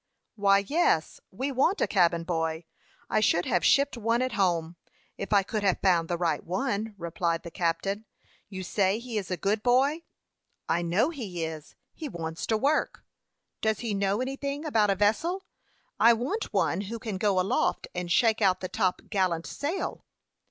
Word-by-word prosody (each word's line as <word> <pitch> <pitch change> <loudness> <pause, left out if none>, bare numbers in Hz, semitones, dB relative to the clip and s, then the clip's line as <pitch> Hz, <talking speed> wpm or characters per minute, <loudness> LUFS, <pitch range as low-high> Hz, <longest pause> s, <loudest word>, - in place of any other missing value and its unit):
"Why, 200 -1 +3
yes; 295 - +1
we 265 +9 -3
want 280 +10 +2
a - - +3
cabin 170 -3 +2
boy. 165 -1 -2 0.4
I - - +1
should 175 -4 +2
have 175 - +1
shipped 280 +10 +4
one 230 +2 +1
at 255 - -1
home, 175 -6 0 0.4
if - - -6
I 200 -2 +5
could 215 +2 -3
have 195 -3 +2
found 175 -4 +3
the 175 - 0
right 170 -1 0
one," 215 +1 -2
replied 170 -1 -2
the 170 - -8
captain. 185 +6 -1 0.4
"You 190 -2 -6
say 195 +2 +1
he 235 -2 -3
is 195 - -7
a 185 - -1
good 205 +5 0
boy?" 270 +7 +3 0.7
"I 170 - +1
know 180 - +1
he 195 - -4
is. 160 -1 -8 0.2
He 310 -3 -6
wants 165 -5 -5
to 220 - +2
work." 285 +7 0 0.6
"Does 220 -1 0
he 230 -3 -2
know 200 +2 0
anything 280 +3 -3
about 220 -8 +2
a 195 - +3
vessel? 320 - +1 0.6
I 235 +1 +7
want 265 - -3
one 195 -3 +1
who 215 +3 -5
can 215 -3 -4
go 200 -2 +2
aloft, 185 +2 0
and 180 -1 -4
shake 225 0 +3
out 190 -3 +3
the 185 - -5
top 185 -4 0
gallant 185 -5 0
sail." 320 +7 -3
200 Hz, 180 wpm, -28 LUFS, 175-235 Hz, 0.7 s, I